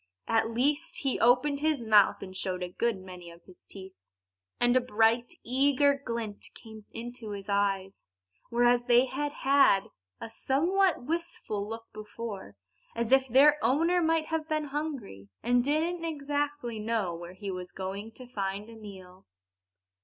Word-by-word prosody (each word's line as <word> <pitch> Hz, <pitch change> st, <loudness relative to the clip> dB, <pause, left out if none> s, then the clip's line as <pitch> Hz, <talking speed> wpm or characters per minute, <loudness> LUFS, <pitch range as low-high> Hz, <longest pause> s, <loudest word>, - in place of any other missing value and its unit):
At 225 Hz, 0 st, +2 dB
least, 285 Hz, +8 st, 0 dB
he 270 Hz, -2 st, 0 dB
opened 255 Hz, +4 st, +3 dB
his 305 Hz, -1 st, +1 dB
mouth 215 Hz, -3 st, +4 dB
and 185 Hz, -1 st, -9 dB
showed 185 Hz, -1 st, -3 dB
a 180 Hz, -, -4 dB
good 230 Hz, +4 st, -1 dB
many 180 Hz, -2 st, -10 dB
of 170 Hz, 0 st, -15 dB
his 185 Hz, -, -18 dB
teeth. 190 Hz, -1 st, -10 dB, 0.7 s
And 245 Hz, +1 st, +4 dB
a 255 Hz, -, +5 dB
bright, 230 Hz, 0 st, +2 dB
eager 280 Hz, +3 st, +3 dB
glint 230 Hz, -4 st, -5 dB
came 220 Hz, -2 st, -12 dB
into 230 Hz, -2 st, -7 dB
his 200 Hz, -1 st, -8 dB
eyes; 195 Hz, -1 st, -1 dB, 0.5 s
whereas 240 Hz, +1 st, +3 dB
they 245 Hz, +1 st, +5 dB
had 280 Hz, +3 st, -3 dB
had 275 Hz, -9 st, +3 dB, 0.3 s
a -, -, -6 dB
somewhat 335 Hz, -, +1 dB
wistful 305 Hz, -10 st, -3 dB
look 225 Hz, 0 st, -6 dB
before, 210 Hz, -, -7 dB, 0.4 s
as 235 Hz, +1 st, -2 dB
if 265 Hz, 0 st, +5 dB
their 290 Hz, +5 st, +5 dB
owner 335 Hz, +6 st, +3 dB
might 325 Hz, -1 st, +2 dB
have 320 Hz, -1 st, -3 dB
been 310 Hz, -2 st, -1 dB
hungry, 265 Hz, -, -5 dB
and 245 Hz, +1 st, +3 dB
didn't 325 Hz, +5 st, 0 dB
exactly 290 Hz, -6 st, -3 dB
know 215 Hz, -5 st, -1 dB
where 170 Hz, +1 st, -8 dB
he 195 Hz, +1 st, -6 dB
was 180 Hz, -1 st, -7 dB
going 195 Hz, +3 st, -6 dB
to 255 Hz, -, -11 dB
find 205 Hz, -2 st, -4 dB
a -, -, -12 dB
meal. 190 Hz, -, -12 dB
235 Hz, 155 wpm, -29 LUFS, 200-285 Hz, 0.7 s, a